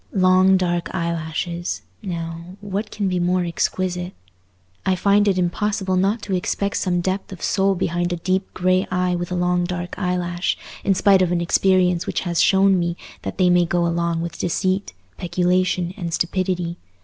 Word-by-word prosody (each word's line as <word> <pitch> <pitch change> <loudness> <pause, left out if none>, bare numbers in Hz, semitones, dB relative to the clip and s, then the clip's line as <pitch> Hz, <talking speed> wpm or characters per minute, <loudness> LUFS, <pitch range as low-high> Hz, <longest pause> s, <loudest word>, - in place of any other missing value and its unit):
Long 185 0 +5
dark 175 -1 -1
eyelashes, 170 +1 -3 0.2
now—what 185 +3 -5
can 205 -2 -2
be 180 -1 0
more 180 +1 +1
exquisite? 180 +1 -2 0.7
I 190 - +2
find 200 +3 +3
it 195 -2 +2
impossible 190 +2 0
not 200 +4 +1
to 195 - -3
expect 200 +2 -1
some 175 -1 0
depth 190 +3 -2
of 185 - -9
soul 195 0 +2
behind 175 0 -1
a - - 0
deep 185 +3 -1
grey 185 +1 +2
eye 180 0 0
with 175 0 -4
a - - -1
long 180 0 +1
dark 175 0 -4
eyelash, 180 -1 -1 0.3
in 195 - +2
spite 195 0 +5
of 180 -2 +2
an 175 - +1
experience 180 0 +2
which - - -1
has 175 -2 0
shown 195 -1 +4
me 170 0 -1 0.2
that - - -5
they 180 -2 +4
may 175 0 +5
go 175 0 +1
along 170 -1 0
with 170 0 -5
deceit, 185 +3 -1 0.3
peculation, 180 0 +1
and 175 -5 -4
stupidity. 180 -1 -1
180 Hz, 170 wpm, -22 LUFS, 175-190 Hz, 0.7 s, Long